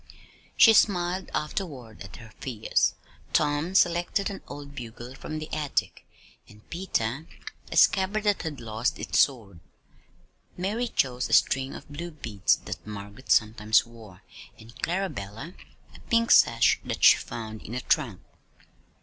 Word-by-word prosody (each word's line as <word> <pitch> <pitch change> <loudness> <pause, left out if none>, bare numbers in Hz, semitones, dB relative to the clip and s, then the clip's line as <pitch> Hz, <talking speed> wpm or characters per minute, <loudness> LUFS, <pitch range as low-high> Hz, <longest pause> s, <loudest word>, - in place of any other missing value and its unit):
She 225 - +8
smiled 185 -3 +2
afterward 145 - -5
at 95 -2 -10
her 110 -2 -13
fears. 115 -5 0 0.4
Tom 150 +4 +1
selected 175 +3 +2
an 195 - -8
old 145 -1 -9
bugle 120 -1 -8
from 155 +3 -7
the 155 0 -5
attic, 150 -2 -2 0.4
and 105 0 -18
Peter 160 -5 -2 0.4
a - - -2
scabbard 200 +2 +4
that 205 -2 +1
had 155 -5 -5
lost 115 +4 -2
its - - -1
sword. 110 - +1 1.0
Mary 210 +7 -1
chose 125 - -1
a - - -2
string 135 0 +3
of - - -10
blue 165 +5 -6
beads 110 - 0
that - - -6
Margaret 105 +4 -9
sometimes 110 +1 +3
wore, 110 -6 -15 0.3
and 115 +2 -15
Clarabella 165 - -4 0.4
a - - -14
pink 230 0 +3
sash 115 0 +5
that - - -5
she - - +9
found 110 -2 -7
in 115 - -7
a 125 - -2
trunk. 120 - 0
135 Hz, 140 wpm, -27 LUFS, 110-175 Hz, 1.0 s, she